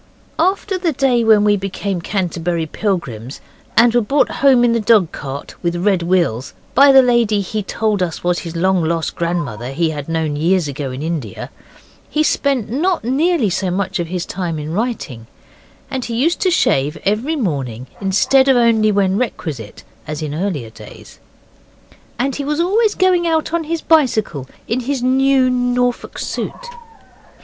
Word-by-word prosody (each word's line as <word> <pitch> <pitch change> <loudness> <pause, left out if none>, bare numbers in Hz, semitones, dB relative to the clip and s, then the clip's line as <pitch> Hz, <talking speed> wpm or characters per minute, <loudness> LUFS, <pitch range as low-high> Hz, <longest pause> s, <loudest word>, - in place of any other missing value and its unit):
After 380 +2 0
the 340 -3 0
day 255 -3 +2
when 220 -2 +5
we 205 0 +4
became 195 -1 -3
Canterbury 175 -3 -2
Pilgrims 150 - -3 0.4
and 235 0 +6
were 240 - +3
brought 275 +7 +1
home 265 -3 +5
in 240 -1 +3
the 230 - +1
dog 210 -5 +3
cart 140 0 -7
with 170 -1 -1
red 185 +1 +1
wheels 170 -9 0 0.2
by 280 0 +7
the 265 -1 +7
lady 235 -4 +2
he 210 +2 -3
told 210 0 -1
us 170 -3 -3
was 175 0 +1
his 170 -1 -7
long 185 +1 +2
lost 165 0 -1
grandmother 145 -9 -3
he 160 +3 0
had 145 0 -6
known 160 -2 -1
years 170 +2 +1
ago 140 -1 -4
in 130 +3 -6
India, 155 - -5 0.6
he 305 - +1
spent 275 -7 0
not 325 - 0
nearly 270 - +1
so 185 +1 -1
much 190 +1 -2
of 170 - -2
his 180 0 -3
time 175 -4 -4
in 150 +1 -5
writing, 175 - -3 0.6
and 260 -2 -3
he 235 - -4
used 315 +9 +1
to 375 - +2
shave 145 - +1
every 220 +11 0
morning 135 - -3 0.2
instead 210 +8 +3
of 265 -2 +5
only 225 -3 +3
when 195 0 +1
requisite, 150 - -5 0.2
as 155 0 -4
in 150 -1 -4
earlier 155 - -3
days. - - -13 1.0
And 265 +2 -1
he 285 - -3
was 300 +2 -2
always 415 +5 +2
going 365 -2 +2
out 320 0 0
on 335 -1 0
his 330 +1 -2
bicycle 220 - +1 0.2
in 230 - 0
his 260 0 -2
new 265 0 +3
Norfolk 245 0 -1
suit. - - -5
205 Hz, 170 wpm, -18 LUFS, 165-260 Hz, 1.0 s, by